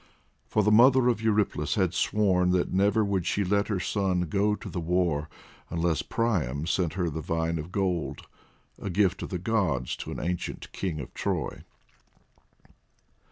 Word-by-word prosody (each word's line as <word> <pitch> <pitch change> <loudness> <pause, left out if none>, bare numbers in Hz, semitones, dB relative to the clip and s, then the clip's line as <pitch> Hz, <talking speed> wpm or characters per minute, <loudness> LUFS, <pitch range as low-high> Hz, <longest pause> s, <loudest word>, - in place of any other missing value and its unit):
For 105 - +1
the 105 - +3
mother 125 +3 +6
of 115 -2 0
Eurypylus 105 -9 +1
had 95 -4 +1
sworn 95 -3 +2
that 90 -1 0
never 100 +3 +3
would 95 -3 -1
she 100 - +1
let 100 +2 +1
her 105 -4 -1
son 95 -1 0
go 100 +5 +1
to - - -9
the 90 - -4
war 85 -3 0 0.4
unless 85 -1 0
Priam 80 - -1
sent 85 -1 0
her 90 -1 -1
the 80 0 -3
vine 80 +1 -1
of 80 +4 -7
gold, 90 -8 -2 0.6
a - - -3
gift 95 0 +1
of - - -5
the 90 - -2
gods 90 - 0
to - - -7
an - - -5
ancient 90 0 -4
King 85 -6 -3
of 70 - -8
Troy. - - -2
90 Hz, 165 wpm, -27 LUFS, 80-105 Hz, 0.6 s, mother